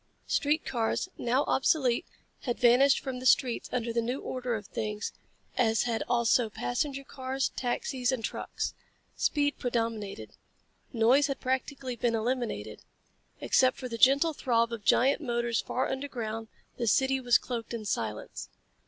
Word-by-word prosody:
Street 300 Hz, +2 st, +1 dB
cars, 230 Hz, -3 st, -1 dB
now 250 Hz, +4 st, +1 dB
obsolete, 265 Hz, 0 st, +2 dB, 0.3 s
had 240 Hz, -3 st, -3 dB
vanished 250 Hz, +3 st, +5 dB
from 260 Hz, -2 st, -4 dB
the 255 Hz, -, -8 dB
streets 255 Hz, -4 st, +3 dB
under 235 Hz, -2 st, -1 dB
the 235 Hz, -, +1 dB
new 245 Hz, +4 st, -2 dB
order 250 Hz, -2 st, -3 dB
of 205 Hz, -2 st, -6 dB
things 210 Hz, +1 st, -4 dB, 0.5 s
as 225 Hz, -2 st, +3 dB
had 230 Hz, -2 st, -1 dB
also 235 Hz, -1 st, +3 dB
passenger 270 Hz, -, -2 dB
cars, 265 Hz, 0 st, -2 dB
taxis 250 Hz, 0 st, -1 dB
and 240 Hz, -4 st, -2 dB
trucks. -, -, -4 dB, 0.4 s
Speed 290 Hz, -1 st, +1 dB
predominated. 225 Hz, -, -2 dB, 0.6 s
Noise 245 Hz, +5 st, +4 dB
had 275 Hz, -1 st, -3 dB
practically 260 Hz, 0 st, -2 dB
been 235 Hz, 0 st, 0 dB
eliminated. 240 Hz, +2 st, -2 dB, 0.6 s
Except 255 Hz, -1 st, +3 dB
for 255 Hz, -, -5 dB
the 230 Hz, -, -5 dB
gentle 280 Hz, +6 st, +5 dB
throb 235 Hz, -4 st, +1 dB
of 220 Hz, -3 st, -6 dB
giant 270 Hz, +9 st, +4 dB
motors 240 Hz, -3 st, 0 dB
far 255 Hz, -, -1 dB
underground, 235 Hz, -5 st, -4 dB, 0.3 s
the 235 Hz, -, -2 dB
city 265 Hz, +4 st, +3 dB
was 245 Hz, -2 st, +4 dB
cloaked 235 Hz, -3 st, -5 dB
in 230 Hz, -2 st, -4 dB
silence. 110 Hz, -, -3 dB
245 Hz, 145 wpm, -29 LUFS, 230-265 Hz, 0.6 s, vanished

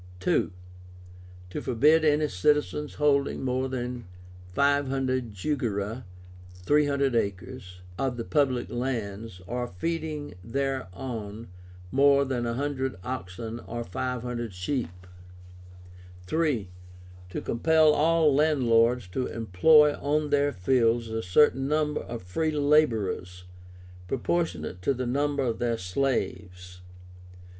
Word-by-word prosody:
II. -, -, +2 dB, 1.0 s
To -, -, -4 dB
forbid 150 Hz, +7 st, +3 dB
any 150 Hz, 0 st, +3 dB
citizen's 150 Hz, +6 st, 0 dB
holding 140 Hz, -2 st, +1 dB
more 130 Hz, +1 st, 0 dB
than 125 Hz, -4 st, -4 dB, 0.4 s
500 135 Hz, 0 st, +1 dB
jugera 110 Hz, 0 st, -2 dB, 0.5 s
(300 140 Hz, +6 st, +1 dB
acres) 95 Hz, -3 st, -3 dB, 0.2 s
of 130 Hz, -3 st, -1 dB
the 115 Hz, -, -3 dB
public 130 Hz, -3 st, 0 dB
lands, 115 Hz, -6 st, -4 dB
or 120 Hz, +4 st, -3 dB
feeding 150 Hz, -, -4 dB
thereon 115 Hz, -3 st, -4 dB, 0.4 s
more 140 Hz, 0 st, +4 dB
than 125 Hz, -3 st, -2 dB
100 130 Hz, +2 st, -2 dB
oxen 115 Hz, 0 st, -5 dB
or 120 Hz, 0 st, -4 dB
500 120 Hz, +2 st, -4 dB
sheep. 90 Hz, -, -4 dB, 1.3 s
III. 150 Hz, -, +1 dB, 0.6 s
To -, -, -4 dB
compel 155 Hz, +5 st, +3 dB
all 160 Hz, 0 st, +3 dB
landlords 125 Hz, -5 st, +3 dB
to 125 Hz, +8 st, -2 dB
employ 145 Hz, -, +4 dB
on 150 Hz, +1 st, -1 dB
their 145 Hz, 0 st, +3 dB
fields 115 Hz, +2 st, +1 dB
a 110 Hz, 0 st, -2 dB
certain 135 Hz, +7 st, +3 dB
number 150 Hz, 0 st, 0 dB
of 115 Hz, -4 st, -7 dB
free 155 Hz, -, -1 dB
laborers, 115 Hz, -12 st, +1 dB, 0.6 s
proportionate 95 Hz, -, -2 dB
to 135 Hz, +9 st, +1 dB
the 130 Hz, +1 st, -3 dB
number 140 Hz, +2 st, 0 dB
of 115 Hz, -3 st, -1 dB
their 120 Hz, -1 st, 0 dB
slaves. 90 Hz, -4 st, -3 dB
125 Hz, 105 wpm, -27 LUFS, 110-145 Hz, 1.3 s, more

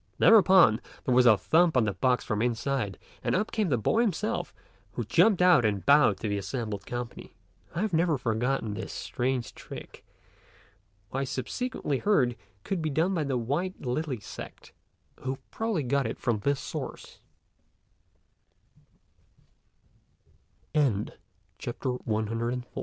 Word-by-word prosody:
Thereupon, 190 Hz, -, +6 dB, 0.2 s
there 130 Hz, -, +2 dB
was 125 Hz, 0 st, +5 dB
a 110 Hz, -3 st, +7 dB
thump 165 Hz, -, +3 dB
on 125 Hz, -, +4 dB
the 100 Hz, -, -1 dB
box 125 Hz, +7 st, +1 dB
from 105 Hz, -2 st, -1 dB
the 115 Hz, -, +2 dB
inside 120 Hz, -3 st, -2 dB, 0.3 s
and -, -, +1 dB
up 210 Hz, +4 st, 0 dB
came 215 Hz, -5 st, 0 dB
the 125 Hz, -, +2 dB
boy 165 Hz, -, +2 dB
himself, 215 Hz, +1 st, -1 dB, 0.4 s
who -, -, -2 dB
jumped 180 Hz, +1 st, +4 dB
out 175 Hz, -8 st, +6 dB
and 100 Hz, -3 st, 0 dB
bowed 140 Hz, -8 st, +5 dB
to 110 Hz, -, -2 dB
the 100 Hz, -1 st, -1 dB
assembled 105 Hz, -2 st, -4 dB
company. 120 Hz, -1 st, -6 dB, 0.4 s
I 170 Hz, -, -1 dB
have 215 Hz, -3 st, -1 dB
never 165 Hz, -2 st, +2 dB
forgotten 120 Hz, -1 st, -1 dB
this 110 Hz, +2 st, -6 dB
strange 125 Hz, -1 st, -2 dB
trick, -, -, -10 dB, 1.1 s
which 135 Hz, -, -1 dB
I -, -, 0 dB
subsequently 135 Hz, -, -3 dB
heard 135 Hz, -, +2 dB, 0.3 s
could 190 Hz, -4 st, -2 dB
be 155 Hz, -, -1 dB
done 165 Hz, +6 st, +1 dB
by 165 Hz, -4 st, 0 dB
the 135 Hz, -2 st, 0 dB
White 150 Hz, +11 st, -2 dB
Lily 130 Hz, 0 st, -2 dB
sect, -, -, -10 dB, 0.5 s
who 130 Hz, 0 st, -3 dB
probably 220 Hz, -9 st, -1 dB
got 135 Hz, +2 st, +1 dB
it -, -, -5 dB
from 115 Hz, -4 st, -1 dB
thi 140 Hz, +7 st, +1 dB
135 Hz, 135 wpm, -28 LUFS, 120-175 Hz, 1.1 s, a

